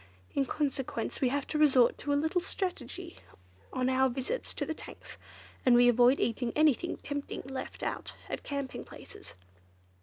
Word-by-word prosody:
In 275 -1 +1
consequence, 270 -6 -2
we 260 - +4
have 280 +2 -1
to 300 - -2
resort 265 -5 +5
to 290 - -2
a - - +4
little 320 +4 +1
strategy 345 -2 -4 0.5
on 255 0 0
our 260 0 +3
visits 265 - -3
to - - -2
the 320 - -2
tanks, - - -11 0.4
and 250 -2 +6
we 245 0 +7
avoid 245 +2 +5
eating 235 +1 0
anything 310 +2 +3
tempting 285 -1 -5
left 265 0 -6
about - - -3
at - - -4
camping 280 -2 -4
places." - - -12
270 Hz, 160 wpm, -31 LUFS, 250-300 Hz, 0.5 s, we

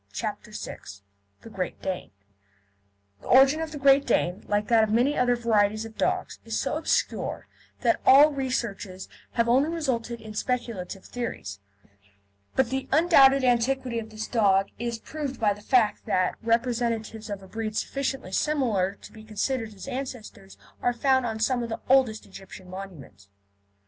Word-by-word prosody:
CHAPTER - - -4
VI - - -6 0.6
THE 225 - -12
GREAT 185 -4 -4
DANE 185 -1 -4 1.1
The - - -12
origin 270 +4 +6
of 320 -1 -4
the 300 - -6
Great 275 0 +5
Dane, 180 -4 0
like 205 0 0
that 230 -2 +5
of 215 - 0
many 245 +7 +2
other 245 -1 +2
varieties 215 -2 +1
of 225 -1 -11
dogs, 370 +7 -1
is - - -2
so - - -1
obscure - - -1 0.4
that - - +2
all 290 +3 +7
researches 235 -9 -3 0.3
have 235 -1 +1
only 265 +6 +3
resulted 245 -8 -2
in 220 -1 -10
speculative 215 -5 -3
theories, 165 - -5 1.0
but 260 -2 +2
the 265 0 -2
undoubted 275 -4 +6
antiquity 250 0 +1
of 220 -1 -8
this 220 0 -5
dog 195 -4 +2
is 235 0 -2
proved 285 +2 -6
by 210 -3 +3
the 205 - -14
fact 225 -1 +2
that 185 -1 +1
representatives 230 -2 -1
of 200 -1 -5
a - - -12
breed 220 +1 -4
sufficiently 270 -7 -3
similar 215 -7 0
to - - -11
be 220 -1 -13
considered 220 +2 -2
his 205 +4 -11
ancestors 250 -7 -7 0.2
are 245 - +1
found 260 +1 +2
on 220 -1 -4
some 245 +2 +1
of 235 - -4
the 225 - -4
oldest 255 -5 +3
Egyptian 190 -1 -12
monuments. 170 - -10
230 Hz, 160 wpm, -26 LUFS, 210-265 Hz, 1.1 s, all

